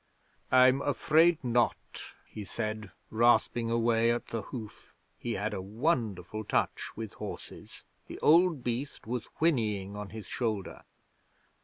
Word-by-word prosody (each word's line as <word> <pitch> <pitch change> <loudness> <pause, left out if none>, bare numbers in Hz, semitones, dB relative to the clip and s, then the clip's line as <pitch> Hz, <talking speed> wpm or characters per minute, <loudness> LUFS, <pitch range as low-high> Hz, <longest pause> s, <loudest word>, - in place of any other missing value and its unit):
'"I'm 130 +1 +6
afraid 155 +3 +3
not," 120 -1 0 0.2
he 105 - -8
said, 110 0 -4 0.2
rasping 120 0 +3
away 115 0 +2
at 120 0 -1
the 115 - -3
hoof. 110 0 -9 0.2
He - - -3
had - - -2
a - - -3
wonderful 110 - -1
touch - - -1
with 110 -2 -6
horses. - - -9 0.2
The - - -8
old 165 -3 +4
beast 125 +4 -3
was 120 0 -3
whinnying 105 - +1
on 105 -1 -6
his 110 -2 -8
shoulder. 110 -6 -3
115 Hz, 130 wpm, -30 LUFS, 110-130 Hz, 0.2 s, I'm